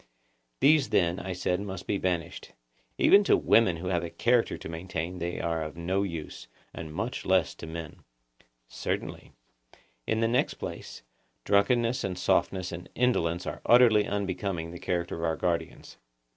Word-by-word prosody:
These 145 -1 +5
then, 85 0 +2
I 95 0 -4
said, 90 0 -1
must 95 -3 -6
be 100 - -1
banished; 85 -2 -3 0.4
even 200 +1 +6
to - - +5
women 95 -7 +3
who 90 +2 -4
have 90 -2 +1
a 85 - -4
character 120 +6 +1
to - - -8
maintain 85 +1 -5
they 85 +1 -3
are 85 -1 -1
of 75 +1 -6
no 95 +3 0
use, 85 -6 -5 0.3
and 80 -2 -7
much 80 - -4
less - - +2
to 80 - -10
men. 80 -1 -7 0.7
Certainly. - - -4 0.8
In 110 - +1
the 115 - +2
next 120 +2 +1
place, - - -8 0.4
drunkenness 115 +4 +2
and 90 -2 -3
softness 95 0 +1
and 85 +1 -8
indolence 90 -9 +1
are - - -5
utterly 115 -4 +5
unbecoming 95 -4 -3
the 85 - -9
character 85 -1 -2
of 85 - -5
our 80 -1 +1
guardians. 85 -2 -3
90 Hz, 160 wpm, -28 LUFS, 85-100 Hz, 0.8 s, even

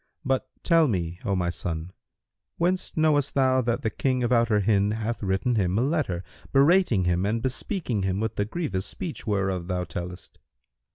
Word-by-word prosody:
But 130 0 0
tell 165 -3 +4
me, 90 -6 -2
O 100 - +1
my 90 -2 0
son, 85 0 -4 0.7
whence 180 +1 0
knowest 150 -3 +2
thou 130 -1 +3
that 120 -1 -1
the 110 - 0
King 130 -2 0
of 120 - 0
Outer 115 -3 +3
Hind 100 +1 +2
hath 110 +1 -3
written 95 +5 0
him 95 -4 +1
a 120 - +2
letter, 135 - -1 0.3
berating 140 - +4
him 90 0 +1
and 105 +3 0
bespeaking 130 - -2
him 95 0 -1
with 110 0 -2
the 100 - 0
grievous 110 - -3
speech 165 -8 -6
whereof 95 -4 0
thou 90 -1 -1
tellest?" 90 +2 -7
110 Hz, 175 wpm, -26 LUFS, 95-135 Hz, 0.7 s, tell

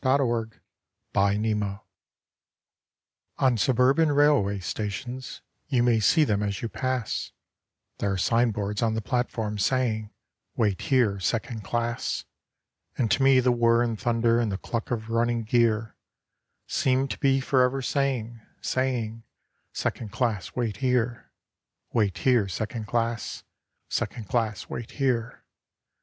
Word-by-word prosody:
SECOND 120 -5 +1 0.6
CLASS 100 +1 +3
WAIT - - -1
HERE 100 -1 -3 1.6
On 130 -2 +3
suburban 130 +7 +3
railway 145 -9 +3
stations 110 +7 -5 0.2
you 125 -4 +2
may 120 -2 +3
see 155 +9 +4
them 105 -7 +1
as 100 0 -2
you - - 0
pass 130 -3 -2 0.7
There 100 - 0
are 95 - -1
signboards 105 -1 +1
on 110 -1 +1
the 110 - -1
platforms 110 -3 -1
saying, 115 -5 0 0.5
'Wait 105 -5 +1
here 120 -7 +2
second 110 +3 -2
class;' 120 +3 -2 0.7
And 115 -4 +1
to - - +2
me 135 -1 +6
the 125 0 +3
whirr 120 0 +3
and 115 -3 -2
thunder 115 0 +2
and 115 -3 0
the 95 - -2
cluck 115 +3 -4
of 115 -2 -3
running 115 0 +1
gear 110 -1 +1 0.7
Seem 130 +1 +1
to - - -5
be 135 -2 +3
for 130 0 +2
ever 130 +1 +1
saying, 125 -4 -1 0.2
saying 120 -4 -1 0.5
'Second 110 -4 -3
class 115 -7 -2
wait 115 -5 -1
here' 125 -1 0 0.6
'Wait 100 -5 +1
here 120 0 +3
second 110 +4 -4
class, 115 0 -2 0.4
Second 110 -4 -3
class 110 -4 -1
wait 115 - -6
here. 125 -4 -1
115 Hz, 135 wpm, -26 LUFS, 110-125 Hz, 1.6 s, me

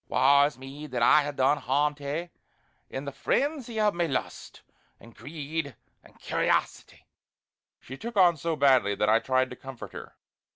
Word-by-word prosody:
Wae 140 +2 +4
is 150 - -9
me! 135 +3 -9
that 125 -4 -2
I 150 - +6
ha' - - -19
done 135 +3 +2
harm 145 +3 +1
to 145 0 -15
a' 170 +5 -4 0.6
in 135 +2 -6
the 140 - -4
frenzy 250 - -1
o' 210 -1 +3
my 170 -2 -1
lust, 135 - -5 0.4
and 115 -1 -16
greed, 145 +2 -5 0.3
and - - -20
curiosity!" - - -2 0.7
She 130 - -10
took 235 -1 -6
on 175 -3 +6
so 165 +2 -2
badly 130 -8 +3
that 105 - +1
I 110 +1 +5
tried 130 +1 0
to - - -7
comfort 135 -3 -10
her. - - -10
145 Hz, 175 wpm, -27 LUFS, 130-165 Hz, 0.7 s, I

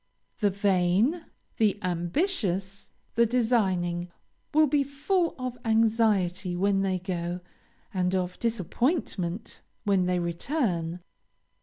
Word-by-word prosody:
The 205 -3 +3
vain, 200 - +2 0.3
the 210 -2 +3
ambitious, 190 - -1 0.2
the 235 0 +4
designing, 190 -8 +1 0.4
will 310 +1 +5
be 290 -1 +2
full 300 +6 0
of 255 -1 -5
anxiety 215 -6 +2
when 195 +2 +2
they 190 -1 +1
go, 175 -1 -3 0.5
and 185 -1 +1
of 180 -1 -2
disappointment 220 - -1 0.2
when 195 -4 +2
they 180 0 +1
return. 175 - -1
195 Hz, 105 wpm, -27 LUFS, 180-240 Hz, 0.5 s, will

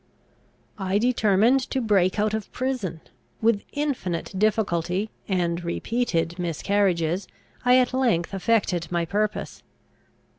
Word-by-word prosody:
"I 190 0 0
determined 225 +1 +3
to 265 - 0
break 200 -6 +2
out 210 0 +1
of 220 -2 -4
prison. 245 -11 -3 0.4
With 220 -2 +2
infinite 265 - -2
difficulty, 195 -1 0 0.2
and 175 -3 0
repeated 170 -2 -1
miscarriages, 175 0 0 0.4
I 250 0 +6
at 255 0 +2
length 230 -10 +1
effected 195 -4 +1
my 170 -1 0
purpose. 210 +5 -2
200 Hz, 110 wpm, -25 LUFS, 175-230 Hz, 0.4 s, I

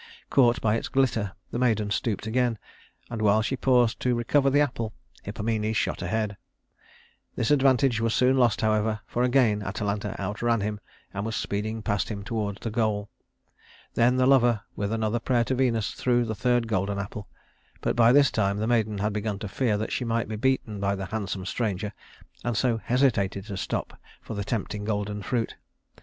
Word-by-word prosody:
Caught 120 -3 +4
by 105 -1 +2
its - - -4
glitter 115 -7 +1 0.2
the 120 - -2
maiden 110 -4 +1
stooped 105 -1 -1
again, 120 0 +1 0.5
and 115 -2 -3
while 105 +1 +4
she 135 - -1
paused 125 -3 +3
to 125 -1 +1
recover 135 +4 +2
the 145 +2 +3
apple, 115 -6 -1 0.3
Hippomenes 110 +1 -2
shot - - -1
ahead. 100 +2 -2 1.0
This 115 - 0
advantage 135 -4 +3
was 115 0 +1
soon 125 +3 +3
lost, 120 -5 +3
however, 110 0 +1
for 120 - -2
again 125 -4 +3
Atalanta 105 0 -3
outran 105 +3 0
him 105 +1 -2 0.3
and 100 - -3
was 110 0 -3
speeding 110 +2 -3
past 100 -2 0
him 100 -2 -5
toward 105 -3 -3
the 115 - -3
goal. 105 -2 -1 0.8
Then 120 +2 +3
the 130 - +3
lover, 120 -5 +4
with 100 0 -2
another 115 +1 0
prayer 120 0 +1
to 130 - -1
Venus, 120 -5 +1
threw 120 -1 +1
the 110 - -2
third 120 +1 +1
golden 100 -1 -1
apple; 100 +1 -5 0.5
but - - -1
by 120 0 +6
this 140 -1 +5
time 100 -2 +1
the 105 - -1
maiden 110 -3 +1
had 105 +1 -1
begun 105 -1 -2
to 105 - -5
fear 105 +2 0
that 110 - -3
she - - -1
might 115 -1 -1
be 110 - -4
beaten 110 -3 0
by 100 0 0
the 95 -1 -4
handsome 100 -2 -4
stranger, 105 -1 -2 0.5
and 120 -2 -1
so 120 -2 +1
hesitated 105 -7 +1
to 100 -2 -6
stop 95 - -4 0.2
for - - -8
the 100 -1 -3
tempting 105 -1 -3
golden 105 -1 -2
fruit. 115 +3 -2
110 Hz, 185 wpm, -26 LUFS, 105-120 Hz, 1.0 s, by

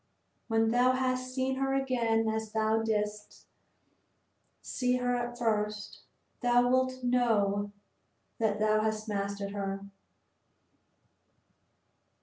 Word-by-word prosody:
When 225 -1 +2
thou 250 +2 +4
hast 255 0 -1
seen 260 0 -1
her 270 0 0
again 235 -4 +1
as 220 0 -2
thou 220 0 +2
didst 210 -1 -3 1.2
see 250 -1 0
her 245 0 0
at 240 0 -3
first, 210 -3 -1 0.4
thou 245 0 +4
wilt 255 0 +1
know 210 -5 +1 0.7
that 215 -2 +1
thou 215 0 +3
hast 215 0 -2
mastered 200 -1 -3
her." 195 -1 -4
225 Hz, 105 wpm, -30 LUFS, 210-250 Hz, 1.2 s, thou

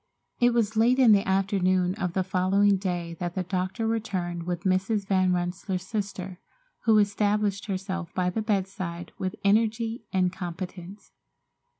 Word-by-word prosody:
It 245 0 +5
was 220 -2 +1
late 235 +4 +4
in 255 -4 +6
the 200 -1 +4
afternoon 185 -2 +2
of 185 -4 -3
the 190 - +1
following 195 +2 +3
day 175 -3 -3
that 175 -1 -3
the 185 - -1
doctor 185 +4 -2
returned 185 -7 -2
with 175 -1 -3
Mrs. 195 +2 +1
Van 185 -2 +2
Rensselaer's 180 +1 -2
sister, 190 -3 -4 0.5
who 220 -2 +5
established 205 0 +1
herself 190 -2 -4
by 180 -1 +1
the 220 - -2
bedside 190 -5 -3
with 185 -1 -2
energy 225 +2 +1
and 185 -1 +1
competence. 180 +2 -7
190 Hz, 150 wpm, -27 LUFS, 180-210 Hz, 0.5 s, in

